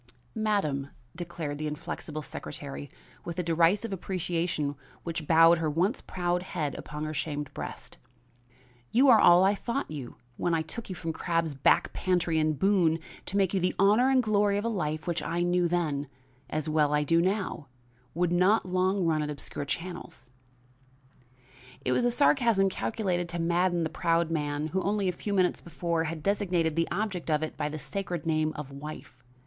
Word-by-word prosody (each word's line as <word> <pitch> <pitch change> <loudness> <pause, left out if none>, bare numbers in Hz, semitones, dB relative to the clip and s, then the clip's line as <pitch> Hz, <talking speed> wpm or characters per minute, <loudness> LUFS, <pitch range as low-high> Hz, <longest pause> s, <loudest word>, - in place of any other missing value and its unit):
"Madam," 195 -11 0 0.3
declared 165 -4 -5
the 155 - -2
inflexible 150 0 -5
secretary 70 - -7 0.3
with 170 - -6
a 180 - 0
derisive 175 +6 +2
appreciation 170 -5 -2 0.3
which 165 -3 -4
bowed 165 +1 +6
her 160 -2 0
once 180 - 0
proud 175 -1 -1
head 160 -6 -3
upon 150 0 -6
her 155 0 -3
shamed 150 -1 -3
breast, - - -8 0.9
"you 260 +4 +5
are 230 -3 +8
all 175 +1 +7
I 195 +1 +4
thought 235 - -3
you 140 -6 -6 0.2
when 170 -1 +1
I 160 - 0
took 200 +9 -7
you 185 - -4
from 165 -2 -4
Crabbe's 165 -2 -1
back 135 - +3
pantry 175 -3 +1
in 155 0 +2
Boone 170 0 +3 0.3
to 195 - -1
make 195 -2 +2
you 195 - +2
the 180 0 0
honor 210 +7 +5
and 260 -1 +4
glory 205 -2 +2
of 205 - -2
a - - +1
life 155 -7 -2
which 175 -1 -1
I 175 +1 -1
knew 175 0 +2
then, 155 -5 -1 0.4
as 155 -1 -2
well 150 -1 +2
as 150 - +2
I - - 0
do 165 +3 +3
now, 185 -5 -1 0.5
would 175 0 +1
not 185 +5 +3
long 185 +1 +1
run 160 -2 +2
in 150 - -2
obscure 145 -1 -5
channels." 170 -4 -6 1.5
It 125 - +2
was 240 - +2
a - - +4
sarcasm 235 -7 +3
calculated 180 -5 -1
to 170 0 -4
madden 175 +1 +1
the - - +1
proud 165 0 +1
man 150 -1 -1
who, 190 +4 -1
only 200 0 0
a - - +2
few 200 +3 -4
minutes 185 -2 +2
before, 170 0 -2
had 155 -1 -5
designated 180 -5 +1
the 165 0 +1
object 185 -3 -2
of 155 0 +2
it 155 - -4
by 150 -1 -2
the 155 - -5
sacred 170 +3 -4
name 155 -1 +1
of 145 -2 -7
wife. 140 -3 -9
170 Hz, 185 wpm, -28 LUFS, 155-190 Hz, 1.5 s, are